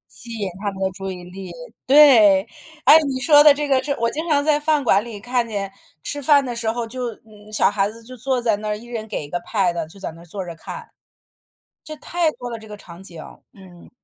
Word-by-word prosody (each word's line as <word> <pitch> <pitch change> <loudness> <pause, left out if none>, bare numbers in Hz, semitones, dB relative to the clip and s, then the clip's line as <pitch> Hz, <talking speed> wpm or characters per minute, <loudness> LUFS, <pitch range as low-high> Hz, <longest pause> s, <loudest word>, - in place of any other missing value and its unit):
吸 230 0 -10
引 205 -4 -3
他 205 -1 -2
们 195 0 -10
的 190 - +1
注 195 +1 -6
意 180 -1 -9
力， 185 0 -9 0.3
对， 245 -9 +7 0.4
哎， 310 - +9
你 260 -1 -2
说 295 +1 +6
的 295 -2 +8
这 295 0 -3
个 265 -2 +2
是 285 - -3
我 230 0 +1
经 320 +3 -5
常 285 -1 +2
在 300 -1 +2
饭 300 -1 +1
馆 205 -4 +3
里 225 -4 -8
看 245 +2 -1
见 200 -3 -4 0.3
吃 290 0 -4
饭 285 0 +4
的 240 -1 -4
时 225 -1 -1
候， 235 -1 -4
就 255 +2 -7 0.5
小 215 - +3
孩 205 -1 0
子 230 +1 -14
就 255 +2 -11
坐 250 +1 -1
在 225 -3 +1
那 210 0 -3
一 220 +3 -11
人 225 -2 -6
给 150 - -4
一 145 - -13
个 175 - -2
pad， 175 -5 -1
就 195 - -15
在 195 - -5
那 165 +1 -14
坐 185 +2 -7
着 170 -1 -8
看。 465 - -9 1.0
这 310 - -8
太 335 +2 -1
多 245 - -8
了， 230 - -5
这 220 - -14
个 210 -1 -9
场 180 -2 -13
景， 175 -3 -12 0.4
嗯。 185 -3 -16
225 Hz, 260 characters per minute, -21 LUFS, 195-270 Hz, 1.0 s, 哎